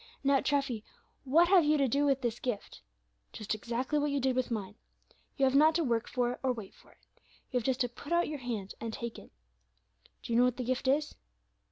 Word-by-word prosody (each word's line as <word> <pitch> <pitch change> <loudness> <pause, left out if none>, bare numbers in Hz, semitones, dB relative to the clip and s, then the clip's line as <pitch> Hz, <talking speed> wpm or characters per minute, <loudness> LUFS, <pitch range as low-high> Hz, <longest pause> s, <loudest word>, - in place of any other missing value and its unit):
Now, 275 0 +4
Treffy, 275 -6 -1 0.4
what 325 +6 +5
have 370 -3 +6
you 300 +1 +3
to 275 -2 +2
do 280 +4 +1
with 270 -1 +2
this 240 -1 -2
gift? 240 -6 -4 0.5
Just 215 0 -3
exactly 240 +7 -2
what 295 0 0
you 280 0 0
did 260 -1 +1
with 255 0 0
mine. 215 -4 -4 0.6
You 275 - +3
have 260 - +2
not 310 +3 +5
to 335 - +2
work 235 -4 0
for 245 -1 0
it, - - -7
or 265 - +1
wait 220 -6 -7
for - - -21
it. - - -33 0.5
You 250 - +1
have 225 - -8
just 260 -2 0
to 245 - +2
put 245 +5 -12
out 345 0 +3
your 300 -1 -5
hand 225 -6 -4
and 230 0 -3
take 235 +1 -6
it. - - -16 0.9
Do 235 - -4
you 230 - +4
know 250 - +6
what 250 -1 0
the 255 - -2
gift 255 +2 -2
is?" 290 +3 +1
255 Hz, 235 wpm, -31 LUFS, 235-285 Hz, 0.9 s, have